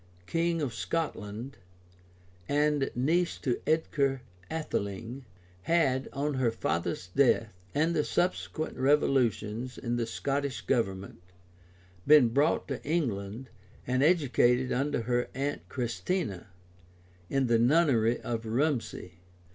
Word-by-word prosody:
king 165 - 0
of 130 -5 -2
Scotland, 120 -4 -4 0.9
and 145 -1 +2
niece 165 +8 +1
to 125 -4 -2
Edgar 140 -4 +1 0.3
Atheling, 120 -4 -4 0.4
had, 135 -6 +2
on 145 +1 -1
her 130 -3 +2
father's 90 -5 -2
death, 115 0 +3 0.3
and 160 +3 +2
the 150 - +2
subsequent 175 -2 -1
revolutions 125 -4 +1
in 120 -1 -2
the 115 -1 -1
Scottish 140 +2 -2
government, 95 -7 -2 0.9
been 145 -5 +7
brought 145 +7 +2
to 135 - -4
England, 125 - -2 0.3
and 130 +1 +1
educated 130 -6 +3
under 135 -2 0
her 120 +1 0
aunt 140 +2 -3
Christina, 120 - -2 0.8
in 135 -1 +1
the 115 -2 +3
nunnery 120 -4 +3
of 115 -1 -3
Rumsey. 115 - -1
130 Hz, 110 wpm, -29 LUFS, 115-150 Hz, 0.9 s, been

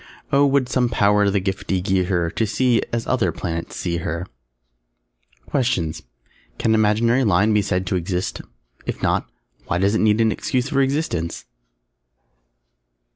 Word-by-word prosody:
Oh 140 +1 +5
would 135 -2 +2
some 125 -1 +1
Power 105 -2 +3
the 100 0 +1
giftie 95 0 -2
gie 95 0 +1
her 85 -3 0
To 110 - -1
see, 120 +2 +2
as 115 -1 -2
other 125 -2 +1
Planets 85 -2 -5
see 85 -2 -2
her! 85 +1 -3 1.2
QUESTIONS 85 - -1 0.6
Can 110 - +1
an 110 - +4
imaginary 115 +4 +3
line 105 0 +3
be 105 - +4
said 95 -2 -1
to 95 - -1
exist? 90 +1 -2 0.5
_If - - -4
not, - - 0 0.4
why - - 0
does 100 +3 +2
it 110 - +1
need 110 0 +3
an 110 -1 +3
excuse 130 +3 -1
for 135 - +2
existence? 135 - -1
105 Hz, 155 wpm, -21 LUFS, 90-120 Hz, 1.2 s, Oh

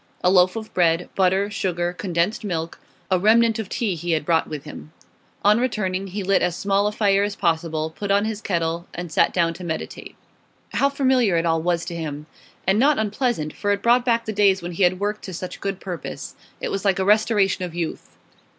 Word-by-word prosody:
A 180 - +4
loaf 185 +1 +4
of 220 -1 -7
bread, 170 -1 +2
butter, 190 +2 +2
sugar, 175 -3 -1
condensed 180 +3 -1
milk; 165 -5 -3 0.3
a 185 - +3
remnant 225 +3 +4
of 210 -4 -4
tea 220 -5 -1
he 170 0 -2
had 155 -2 -1
brought 165 0 +2
with 150 -3 -6
him. 150 0 -10 0.5
On 210 +2 +5
returning, 195 -6 -1
he 195 +2 -4
lit 195 0 +2
as 180 -2 0
small 200 +1 +1
a - - 0
fire 200 -2 +2
as 205 0 -2
possible, 160 -2 -1
put 205 - -5
on 200 +1 +3
his 220 -1 -3
kettle, 170 -3 -2
and 175 -1 -6
sat - - +3
down 170 -2 +1
to 180 - -10
meditate. 160 -2 -6 0.6
How 280 - +3
familiar 260 -9 +2
it 165 - 0
all 165 -1 +1
was 170 0 0
to 175 - -5
him! 150 -2 -5 0.4
And 195 +3 +3
not 285 +3 +4
unpleasant, 220 - -1
for 205 - -3
it 200 - -1
brought 240 +1 +4
back 230 -2 +1
the 220 - -3
days 195 -3 +3
when 175 - -4
he 175 - -5
had 180 0 +3
worked 210 +1 -2
to 185 - -6
such 180 +2 -7
good 195 -1 -3
purpose. 180 -3 -6 0.3
It - - -3
was 195 -1 -2
like 195 -3 +2
a 190 - 0
restoration 205 -2 +3
of 175 -2 -5
youth. 170 -2 -5
190 Hz, 215 wpm, -23 LUFS, 170-210 Hz, 0.6 s, On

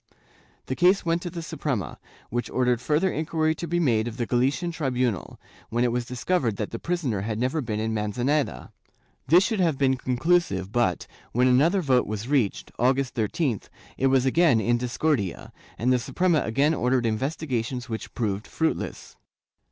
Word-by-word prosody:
The 130 - -3
case 180 +4 +3
went 165 +1 +1
to 175 - -4
the 170 -1 -6
Suprema, 140 - -3 0.3
which 120 +1 -2
ordered 125 -2 +1
further 155 +8 +1
inquiry 155 0 0
to 170 +2 -6
be 175 +2 0
made 120 -8 +2
of 115 0 -6
the 120 - -1
Galician 135 +9 0
tribunal, 125 - -2 0.3
when 120 +2 0
it 120 - +2
was 120 0 -1
discovered 125 - 0
that 105 0 -4
the 115 - -5
prisoner 150 - -1
had 105 +1 -3
never 130 +7 0
been 110 -4 -3
in 110 0 -1
Manzaneda. 110 - -1 0.6
This 175 +7 +6
should 220 0 -1
have 165 -6 +2
been 130 -1 +2
conclusive 125 - +1
but, 110 -7 +1 0.3
when 125 +2 +3
another 160 +10 +3
vote 130 -4 +2
was 110 +2 -4
reached, 130 -8 0
August 130 +2 +2
13th, 115 - -1 0.3
it 135 - +1
was 135 -1 +3
again 140 -3 +4
in 120 +2 +1
discordia, 125 - -1 0.2
and 125 +3 +2
the 125 - +2
Suprema 170 +6 +1
again 140 +8 +2
ordered 125 -3 +1
investigations 125 0 -2
which 110 -2 -5
proved 105 -3 -2
fruitless. 160 0 -3
130 Hz, 170 wpm, -25 LUFS, 115-155 Hz, 0.6 s, This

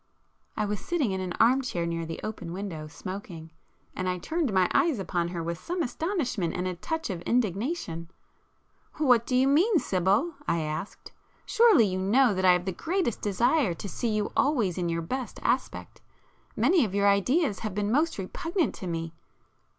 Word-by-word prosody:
I 215 - +1
was 205 -1 -2
sitting 290 - -1
in 190 0 -2
an 180 -1 -3
arm 250 +7 +4
chair 180 -10 -2
near 165 -1 -3
the 165 - -5
open 205 -6 -5
window, 180 -5 -5
smoking, 165 0 -8 0.4
and 185 0 -2
I 180 - -1
turned 315 - -1
my 185 -2 +3
eyes 325 -7 +3
upon 175 -3 -1
her 170 -1 -4
with 170 +1 -4
some 355 0 -2
astonishment 250 - -2
and 180 +1 -2
a 185 - -2
touch 320 - -3
of 175 -3 -5
indignation. 205 - -1 0.9
"What 250 -6 +3
do 250 - 0
you 260 +1 +4
mean, 345 +9 +4
Sibyl?" 200 - +1
I 170 - +1
asked—"Surely 220 - +1
you 185 -1 -2
know 225 +5 +4
that 185 0 0
I 180 - +7
have 180 0 0
the 190 - -1
greatest 325 - -2
desire 230 - +2
to 200 - -7
see 235 +5 -2
you 215 -1 -1
always 240 - +2
in 175 -2 -1
your 165 0 -2
best 255 +8 -4
aspect,—many 355 -6 -1
of 200 -4 -3
your 200 0 +3
ideas 210 - +2
have 215 -4 -4
been 205 0 -1
most 310 +6 +1
repugnant 330 - -2
to 185 - -7
me...." 165 -1 -4
205 Hz, 180 wpm, -27 LUFS, 180-270 Hz, 0.9 s, I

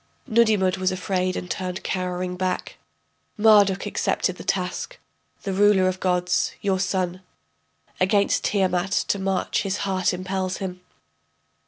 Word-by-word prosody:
Nudimmud 215 -6 +3
was 185 0 +1
afraid 185 0 -1
and 180 - -4
turned 185 0 -4
cowering 180 -1 -2
back, 185 0 -3 0.6
Marduk 205 -3 +5
accepted - - -1
the - - -8
task, - - -2 0.5
the 195 - -2
ruler 200 -1 +4
of 185 0 -1
gods, 180 -1 +1
your 195 -3 0
son, 185 -1 -1 0.8
Against 200 +2 +2
Tiamat 185 -2 +1 0.2
to 200 - +1
march 190 0 0
his 200 0 -2
heart 185 -2 +1
impels 185 0 -3
him. 185 -2 -6
185 Hz, 130 wpm, -24 LUFS, 185-195 Hz, 0.8 s, Marduk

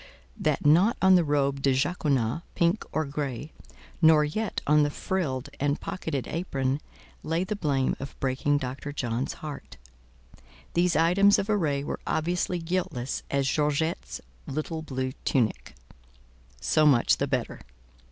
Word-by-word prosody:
that - - 0
not 180 - +5
on 190 0 +6
the 180 -2 +6
robe 140 -2 0
de 135 -1 +3
jaconas, 140 -3 0
pink 170 +5 +2
or 155 - 0
grey, 140 0 -4 0.5
nor 160 -2 +6
yet 215 +9 -2
on 150 +1 +5
the 145 - +2
frilled 145 -5 -2
and 145 +1 0
pocketed 150 -7 -4
apron, 140 -5 -2 0.4
lay 165 +3 -1
the 210 +3 -3
blame 140 -8 0
of 135 - -8
breaking 135 +2 +1
Dr. 135 +1 -5
John's 125 -2 -2
heart: 150 -2 -8 1.0
these 175 0 +2
items 185 +5 +5
of 205 - -1
array 150 -9 +1
were - - -4
obviously 175 +3 0
guiltless 165 -7 -2
as 140 -1 +1
Georgette's 150 +3 -1 0.3
little 155 +3 -3
blue 130 -4 -3
tunic. 120 -6 0 0.8
So 155 - +3
much 130 -5 +4
the - - -1
better. - - -2
150 Hz, 140 wpm, -27 LUFS, 135-170 Hz, 1.0 s, on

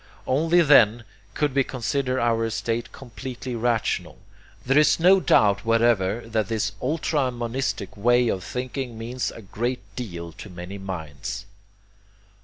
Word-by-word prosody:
Only 165 +6 +3
then 120 -6 +5 0.3
could 150 -3 0
we 135 0 +3
consider 130 +1 -1
our 115 -1 +1
estate 115 +1 -2
completely 125 0 -7
rational. 115 -1 -1 0.5
There 135 +3 +4
is 150 +2 +4
no 185 +3 +6
doubt 100 - +3
whatever 115 -2 +2
that 110 -2 -1
this 105 -2 -1
ultra 150 -1 0
monistic 120 -5 -3
way 120 +3 +3
of 95 -4 -1
thinking 125 0 -4
means 120 +3 -3
a 115 - -11
great 120 +6 -3
deal 85 -9 -6
to 100 - -11
many 90 +2 -8
minds. 95 +1 -6
120 Hz, 135 wpm, -24 LUFS, 105-130 Hz, 0.5 s, no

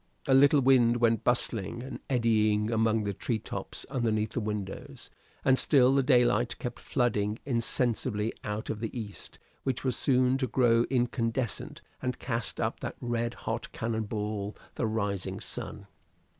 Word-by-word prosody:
A 135 - +4
little 140 +2 +6
wind 125 -3 +5
went 115 -2 +2
bustling 120 -1 0
and 130 - -7
eddying 110 -3 +2
among 110 -1 +2
the 100 -1 -2
treetops 110 +3 -4
underneath 110 -5 0
the - - -2
windows. 105 -3 -5 0.3
And 130 -1 +4
still 130 -3 +5
the 140 - +4
daylight 125 -2 +3
kept 125 - -5
flooding 110 -5 0
insensibly 115 -3 0
out 105 +1 -3
of 105 - -5
the 115 +2 -4
east, 105 -3 -9 0.2
which 130 -2 -2
was 130 -3 +1
soon 130 0 +2
to 130 - 0
grow 120 -1 +3
incandescent 120 -2 -1 0.2
and 125 -1 -2
cast 115 -2 -2
up - - -1
that - - -5
red 120 0 -2
hot 115 +1 -3
cannon 110 -1 -2
ball, 105 -1 -3 0.2
the 115 - -1
rising 100 -3 -2
sun. 105 -3 -5
115 Hz, 150 wpm, -29 LUFS, 110-125 Hz, 0.3 s, little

